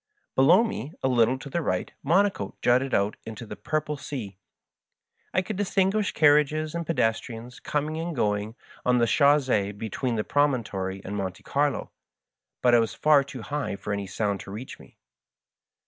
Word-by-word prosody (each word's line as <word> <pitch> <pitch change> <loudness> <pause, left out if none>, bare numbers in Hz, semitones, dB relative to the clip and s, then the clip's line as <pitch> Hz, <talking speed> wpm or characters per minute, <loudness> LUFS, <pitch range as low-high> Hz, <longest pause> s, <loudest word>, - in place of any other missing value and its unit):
Below 135 - +6
me, 170 - -4
a - - +3
little 125 0 +3
to 135 - -10
the 170 +5 -2
right, 95 - -2
Monaco 175 - +1
jutted 130 +2 +3
out 100 +1 +1
into 110 +1 -8
the - - -7
purple 150 -1 -2
sea. 125 -9 -6 0.9
I 185 - +1
could 200 +1 -5
distinguish 195 +1 +1
carriages 150 +1 +3
and 170 -1 -4
pedestrians 120 -4 -2
com 150 0 -1
ing 155 - -4
and 165 0 -3
going 105 -1 -1 0.3
on 125 0 +3
the 120 - +4
chanss^e 130 -8 +3
between 115 +3 -2
the 105 - 0
promontory 110 -10 0
and 100 - -4
Monte 95 -2 -4
Carlo, 145 0 0 0.7
but 125 -1 +5
I 120 - +7
was 115 -1 -1
far 150 -2 +5
too 135 -4 -9
high 140 -1 -3
for 100 +1 -4
any 100 -1 -3
sound 100 +1 -1
to - - -10
reach 115 +6 -8
me. - - -17
130 Hz, 170 wpm, -26 LUFS, 105-150 Hz, 0.9 s, I